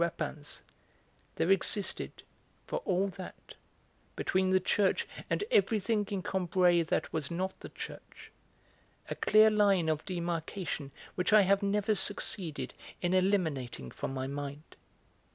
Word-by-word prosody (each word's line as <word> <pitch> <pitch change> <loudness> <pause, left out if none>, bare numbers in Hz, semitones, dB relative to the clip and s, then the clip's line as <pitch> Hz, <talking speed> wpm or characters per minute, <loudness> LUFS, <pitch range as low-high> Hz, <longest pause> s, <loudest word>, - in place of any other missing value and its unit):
Rapin's, 155 -3 -3 0.7
there 175 - +1
existed, 195 +1 +1 0.4
for - - -2
all 195 +1 +1
that, 185 - -10 0.6
between 185 0 +1
the 185 0 +4
church 190 +1 +1 0.2
and - - 0
everything 220 - +2
in 195 -3 -3
Combray 180 -2 +2
that 165 - -1
was 155 -3 -2
not 185 +3 -3
the - - -9
church - - -10 0.8
a - - -1
clear 215 +1 +5
line 200 -6 +3
of 155 -1 0
demarcation 170 -3 -3 0.2
which 180 +2 0
I 215 0 +8
have 195 +2 +3
never 205 +2 +1
succeeded 190 -4 0 0.3
in 175 +1 +1
eliminating 160 - 0
from - - -4
my 130 -1 -3
mind. 140 +2 -6
185 Hz, 130 wpm, -31 LUFS, 160-200 Hz, 0.8 s, I